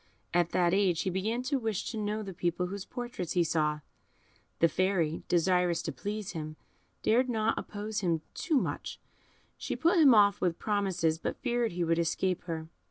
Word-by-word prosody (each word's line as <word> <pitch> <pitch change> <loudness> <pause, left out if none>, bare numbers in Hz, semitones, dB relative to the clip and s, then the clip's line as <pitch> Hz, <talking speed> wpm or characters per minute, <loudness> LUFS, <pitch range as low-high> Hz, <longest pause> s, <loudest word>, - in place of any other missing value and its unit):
At 175 -1 +3
that 175 -1 +2
age 190 -4 +2
he 190 - -1
began 220 +7 -1
to 270 +1 0
wish 220 -5 -2
to - - -6
know 215 0 -2
the 195 -2 -7
people 175 +1 -1
whose 195 +1 -5
portraits 240 -8 -5
he 175 - +3
saw; 150 -2 0 0.8
the 165 - +5
Fairy, 170 -2 0
desirous 180 0 +2
to 160 - -3
please 205 +8 -4
him, 155 -3 -6 0.5
dared 250 +4 +3
not 225 -2 +1
oppose 210 +1 -4
him 170 -5 0
too 315 -5 0
much; - - -3 0.6
she - - -3
put 340 +2 +3
him 275 -7 +7
off 200 -1 +5
with 175 -2 +1
promises, 185 -6 0
but - - -3
feared 240 -5 0
he 175 0 -1
would 165 0 +1
escape 180 +2 0
her. 160 -2 -4
185 Hz, 180 wpm, -30 LUFS, 170-215 Hz, 0.8 s, him